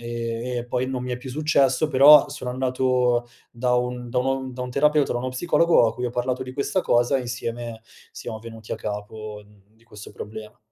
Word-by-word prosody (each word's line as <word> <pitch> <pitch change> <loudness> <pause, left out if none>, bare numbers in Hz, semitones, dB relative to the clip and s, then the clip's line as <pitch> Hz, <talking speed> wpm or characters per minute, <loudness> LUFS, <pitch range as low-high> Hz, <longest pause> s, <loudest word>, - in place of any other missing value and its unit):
e 120 +1 -4
e 120 - -4
poi 125 +1 -1
non 125 -1 -3
mi 125 - -3
è - - -2
più 130 +1 -9
successo, 150 0 +2
però 145 +1 +7
sono 140 -3 -5
andato 125 -1 +1 0.2
da 125 +1 0
un 125 0 -3
da 125 - 0
un 130 0 -1
da 125 0 -5
un 125 - -5
terapeuta, 150 +2 +2
da 120 - -1
uno 130 +1 -3
psicologo, 170 0 +3
a - - 0
cui 125 0 -3
ho - - -3
parlato 125 +1 -2
di 130 0 -8
questa 145 +7 -1
cosa 120 0 +2
e - - -1
insieme 120 -1 -5 0.3
siamo 110 -2 -7
venuti 115 -1 -9
a - - -2
capo 105 0 -6 0.3
di 115 +1 -28
questo 105 -2 -12
problema. 110 0 -9
125 Hz, 205 wpm, -24 LUFS, 115-130 Hz, 0.3 s, però